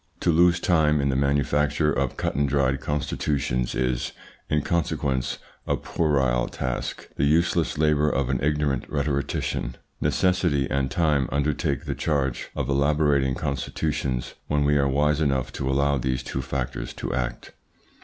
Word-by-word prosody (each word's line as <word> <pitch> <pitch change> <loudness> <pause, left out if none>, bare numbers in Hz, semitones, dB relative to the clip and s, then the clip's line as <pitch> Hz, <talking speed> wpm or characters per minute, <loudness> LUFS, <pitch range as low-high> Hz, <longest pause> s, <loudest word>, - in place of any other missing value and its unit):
To - - +3
lose 85 +1 +4
time 80 -4 +3
in 70 0 +1
the 65 - +1
manufacture 75 +2 +2
of 70 -1 -1
cut - - -1
and 70 0 +1
dried 65 -1 +1
constitutions 70 -3 -1
is, 65 -1 -1 0.4
in 75 -1 +1
consequence, 70 -6 -1 0.3
a - - +1
puerile 65 -6 +1
task, 65 -1 -4
the - - +1
useless 80 +2 +2
labour 75 -1 +3
of 70 -2 0
an 65 - 0
ignorant 75 -3 0
rhetorician. 70 -4 -2 0.3
Necessity 90 -7 +2
and 70 -1 0
time 75 -1 +1
undertake 70 -1 0
the - - -2
charge 70 -5 -1
of - - -2
elaborating 70 -1 +2
constitutions 70 -1 -2
when 75 -1 +1
we 75 0 +3
are 70 -1 +3
wise 75 +2 +2
enough 70 -4 0
to 65 - -2
allow 70 +1 +2
these 65 +1 -1
two 65 - -3
factors 65 -1 -4
to - - -4
act. - - -3
70 Hz, 150 wpm, -25 LUFS, 65-75 Hz, 0.4 s, lose